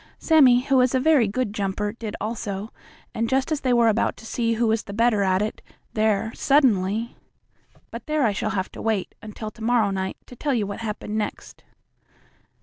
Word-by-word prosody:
Sammie, 265 -7 +5
who 270 +1 +1
was 255 0 +3
a - - +3
very 280 -5 +4
good 215 +1 -2
jumper, 205 0 -2
did 225 -3 -6
also, 210 -1 -4 0.4
and 225 0 -1
just 265 +3 0
as 305 - 0
they 255 - 0
were 235 -1 +4
about 220 +1 +1
to - - -13
see 230 0 -1
who 230 +1 +1
was 225 0 0
the 200 - -8
better 230 -2 +3
at 190 0 +2
it, 215 - -5 0.3
there 220 0 +1
suddenly 230 -5 +2 0.8
But - - -8
there, 305 -1 +1
I 210 - +2
shall 215 - -2
have 190 -4 -2
to - - -9
wait 220 -4 -1
until 215 0 -7
to 220 - -17
morrow 225 -3 +2
night 190 -1 -3
to 250 - -13
tell 280 +2 -1
you 215 -3 0
what 200 0 -6
happened 215 -1 -4
next. 210 - -6
225 Hz, 200 wpm, -24 LUFS, 210-245 Hz, 0.8 s, Sammie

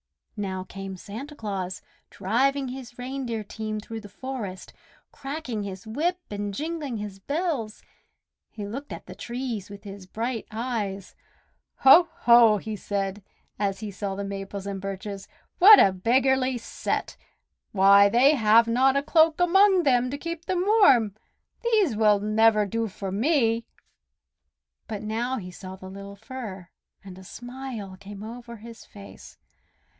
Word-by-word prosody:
Now 190 -3 -3
came 195 0 -8
Santa 250 +11 -8
Claus, 195 -6 -5 0.3
driving 260 +7 0
his 250 -2 -9
reindeer 250 -3 -4
team 215 +1 -5
through 225 +1 -7
the 205 - -12
forest, 220 -6 -7 0.4
cracking 275 -5 -5
his 195 +1 -7
whip 315 +11 -1
and 205 0 -3
jingling 300 0 -4
his 205 -2 -7
bells. 285 - -3 0.7
He 210 - -7
looked 270 +8 -7
at - - -8
the - - -9
trees 240 -5 -5
with 200 0 -11
his 195 -2 -10
bright 230 +3 -4
eyes. 215 -4 -4 0.7
"Ho! 340 +6 +8
ho!" 235 -3 +7
he 215 +2 -5
said 200 0 -3 0.4
as 200 0 -1
he 215 -2 -5
saw 200 0 -4
the 200 - -4
Maples 195 0 -6
and 195 -1 -5
Birches. 195 0 -6 0.3
"What 410 +3 +10
a 195 - +6
beggarly 255 +6 +2
set! 230 - -3 0.6
Why, 200 +1 +6
they 255 +7 +5
have 230 -3 +5
not 260 +4 +3
a 280 - 0
cloak 320 +1 +4
among 375 +1 +5
them 250 -3 +3
to 280 - -4
keep 335 +2 -6
them 365 -1 0
warm. 275 - +5 0.5
These 425 - +2
will 210 -1 +4
never 215 +1 +3
do 225 +3 -2
for 195 -1 -6
me." 230 - +1 1.2
But 210 -1 -5
now 235 +4 -2
he 180 -5 -7
saw 185 +1 -9
the 190 0 -11
little 200 +1 -9
Fir, 205 -5 -8 0.3
and 190 -1 -11
a - - -12
smile 245 -3 -8
came 200 0 -10
over 235 +1 -8
his 230 +2 -12
face. 200 -1 -13
220 Hz, 150 wpm, -26 LUFS, 200-265 Hz, 1.2 s, What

